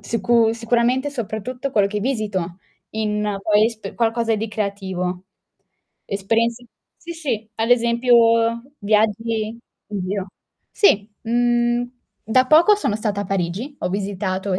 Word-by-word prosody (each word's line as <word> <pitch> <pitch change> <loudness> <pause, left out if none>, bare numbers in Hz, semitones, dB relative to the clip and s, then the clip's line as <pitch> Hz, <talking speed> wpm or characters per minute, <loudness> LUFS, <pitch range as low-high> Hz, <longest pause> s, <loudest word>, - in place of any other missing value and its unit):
sicu 225 +2 +2
sicuramente 240 +4 +1
soprattutto 250 +1 -4
quello 205 -6 +3
che 210 +1 -3
visito 205 -7 -2 0.3
in 210 -1 -1
poi 210 +1 +4
esp 220 -4 -6
qualcosa 230 -1 +1
di 220 +2 -3
creativo. 190 -3 -3 0.8
Esperienze 230 +4 0 0.3
sì, 340 - -8
sì 260 -10 -4
ad 225 +1 0
esempio 235 0 +4 0.6
viaggi, 220 +1 0 0.3
in 205 -2 -4
giro. 195 0 -3 0.4
Sì, 210 - +3
mhmm, 240 +1 +1 0.4
da 255 +3 +4
poco 330 +9 +6
sono 405 - -1
stata 210 -2 -2
a - - -6
Parigi, 195 - -3
ho - - -1
visitato 190 -1 -2
220 Hz, 125 wpm, -21 LUFS, 200-240 Hz, 0.8 s, poco